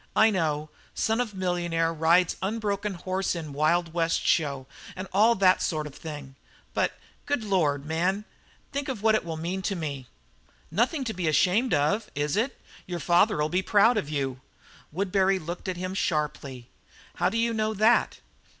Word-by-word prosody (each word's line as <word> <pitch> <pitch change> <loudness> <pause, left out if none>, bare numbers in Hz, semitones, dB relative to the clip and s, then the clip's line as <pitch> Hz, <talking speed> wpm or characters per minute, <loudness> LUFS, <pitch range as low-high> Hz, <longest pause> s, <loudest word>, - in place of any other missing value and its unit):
"I 220 0 +6
know 155 -5 -1 0.2
son 225 +2 +1
of 220 -5 -4
millionaire 175 -3 0
rides 165 +2 +3
unbroken 205 -1 -2
horse 185 +2 -2
in 155 -4 -6
Wild 165 +3 +1
West 165 -1 0
show 140 -5 +1 0.3
and 185 +1 -6
all 220 +4 +5
that 190 -2 +4
sort 155 -3 -1
of 150 - -8
thing. 145 -4 -8 0.4
But, - - +1 0.3
good 285 -5 0
Lord, 155 -9 +1
man, 180 +6 0 0.5
think 280 0 -3
what 220 -4 +1
it 215 - +2
will 165 -1 -5
mean 175 +4 -3
to 195 +1 -2
me?" 140 -6 -5 0.6
"Nothing 305 -5 +1
to 225 -3 -3
be 180 -3 -2
ashamed 190 - +3
of, 200 +10 +1
is 145 +2 -1
it? 235 +6 -1 0.3
Your 175 -1 -4
father'll 175 0 +3
be 180 +4 0
proud 210 +5 +4
of 180 -9 -2
you." 135 -3 -2 0.5
Woodbury 195 +2 +1
looked 175 +1 -6
at 180 - -3
him 185 +1 -4
sharply. 150 -8 -2 0.5
"How 175 - +2
do 225 - -2
you 230 0 +1
know 220 0 -1
that?" 220 +4 +3
180 Hz, 170 wpm, -27 LUFS, 155-210 Hz, 0.6 s, I